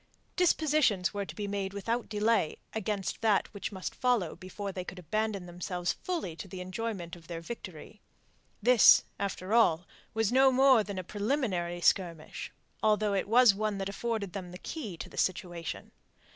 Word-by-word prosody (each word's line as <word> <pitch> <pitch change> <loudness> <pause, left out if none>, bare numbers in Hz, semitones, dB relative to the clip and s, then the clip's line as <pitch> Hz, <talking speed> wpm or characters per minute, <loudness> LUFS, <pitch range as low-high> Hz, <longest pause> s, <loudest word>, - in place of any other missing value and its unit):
Dispositions 305 - +2
were 200 -1 -3
to - - -8
be 205 -2 -3
made 195 -1 -3
without 230 +4 -2
delay 210 -5 +1 0.2
against 210 -2 -2
that 215 -2 +2
which 200 - -5
must 190 -2 -5
follow 245 -9 +1
before 190 +3 -6
they 185 -1 -5
could 185 - -8
abandon 200 +2 -2
themselves 175 0 -3
fully 330 - -4
to 195 - -7
the 185 0 -8
enjoyment 185 -2 -4
of 165 -2 -16
their 170 -1 -5
victory. 190 +1 -9 0.6
This, 245 -1 +7 0.2
after 195 0 -3
all, 175 -8 +4 0.3
was 225 -1 +1
no 265 +1 +6
more 260 -3 +5
than 200 -2 -6
a 185 - -3
preliminary 200 -5 -1
skirmish, 170 -4 0 0.3
although 215 -1 +2
it 195 - 0
was 235 0 +6
one 210 0 -1
that 195 0 -3
afforded 210 -2 -3
them 185 -3 -6
the 180 - -9
key 215 - -6
to - - -6
the - - -14
situation. 175 -3 -2
200 Hz, 170 wpm, -30 LUFS, 180-225 Hz, 0.6 s, This